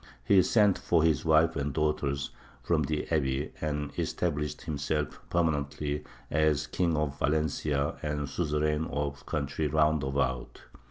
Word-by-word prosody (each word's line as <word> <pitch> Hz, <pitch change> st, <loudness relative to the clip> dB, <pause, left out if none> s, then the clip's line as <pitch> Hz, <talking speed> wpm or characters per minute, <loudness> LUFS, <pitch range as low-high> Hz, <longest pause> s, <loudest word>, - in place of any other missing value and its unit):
He 100 Hz, -2 st, +6 dB
sent 105 Hz, -1 st, +3 dB
for 85 Hz, -2 st, +2 dB
his 80 Hz, -3 st, +2 dB
wife 80 Hz, 0 st, +4 dB
and 70 Hz, -1 st, -1 dB
daughters 75 Hz, -2 st, -1 dB, 0.3 s
from 80 Hz, +3 st, +2 dB
the 75 Hz, +1 st, -2 dB
abbey, 70 Hz, -3 st, 0 dB
and 75 Hz, -1 st, -2 dB
established 75 Hz, -3 st, -2 dB
himself 75 Hz, -1 st, -2 dB
permanently 75 Hz, -3 st, 0 dB, 0.3 s
as 75 Hz, -1 st, +2 dB
King 85 Hz, -4 st, 0 dB
of 75 Hz, -2 st, -2 dB
Valencia 75 Hz, -1 st, 0 dB
and 75 Hz, -2 st, -2 dB
suzerain 75 Hz, 0 st, 0 dB
of 70 Hz, -1 st, -3 dB
the -, -, -20 dB
country 75 Hz, +1 st, -1 dB
round 80 Hz, 0 st, +3 dB
about. 65 Hz, -2 st, -2 dB
75 Hz, 140 wpm, -29 LUFS, 70-80 Hz, 0.3 s, He